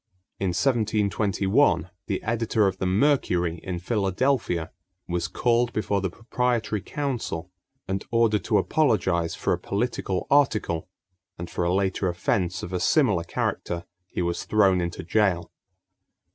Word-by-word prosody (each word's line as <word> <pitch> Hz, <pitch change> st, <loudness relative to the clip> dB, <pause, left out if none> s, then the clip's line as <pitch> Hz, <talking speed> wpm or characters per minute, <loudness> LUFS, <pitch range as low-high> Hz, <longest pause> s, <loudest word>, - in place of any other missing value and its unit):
In 95 Hz, -, 0 dB
1721 100 Hz, -, +1 dB, 0.2 s
the 95 Hz, -3 st, -2 dB
editor 115 Hz, -1 st, +1 dB
of 95 Hz, -1 st, 0 dB
the 95 Hz, -, 0 dB
Mercury 90 Hz, -, +2 dB
in 90 Hz, -2 st, -4 dB
Philadelphia 95 Hz, -, 0 dB, 0.4 s
was 85 Hz, -1 st, -1 dB
called 120 Hz, +3 st, +1 dB
before 100 Hz, -2 st, 0 dB
the 95 Hz, -, -1 dB
proprietary 115 Hz, 0 st, -1 dB
council 115 Hz, -, -3 dB, 0.4 s
and 95 Hz, +1 st, -2 dB
ordered 115 Hz, -4 st, +2 dB
to -, -, +3 dB
apologize 95 Hz, -, +1 dB
for -, -, 0 dB
a -, -, -2 dB
political 100 Hz, -3 st, -2 dB
article, 110 Hz, -, +2 dB, 0.5 s
and 85 Hz, 0 st, -7 dB
for -, -, -1 dB
a 85 Hz, -, +1 dB
later 95 Hz, 0 st, +1 dB
offense 90 Hz, +1 st, -1 dB
of 90 Hz, -, -6 dB
a 90 Hz, -, 0 dB
similar 100 Hz, -, +3 dB
character 85 Hz, 0 st, -3 dB, 0.2 s
he 90 Hz, -, -3 dB
was 85 Hz, 0 st, -2 dB
thrown 95 Hz, -4 st, +3 dB
into 85 Hz, +1 st, -4 dB
jail. 90 Hz, -1 st, +1 dB
95 Hz, 135 wpm, -25 LUFS, 90-115 Hz, 0.5 s, to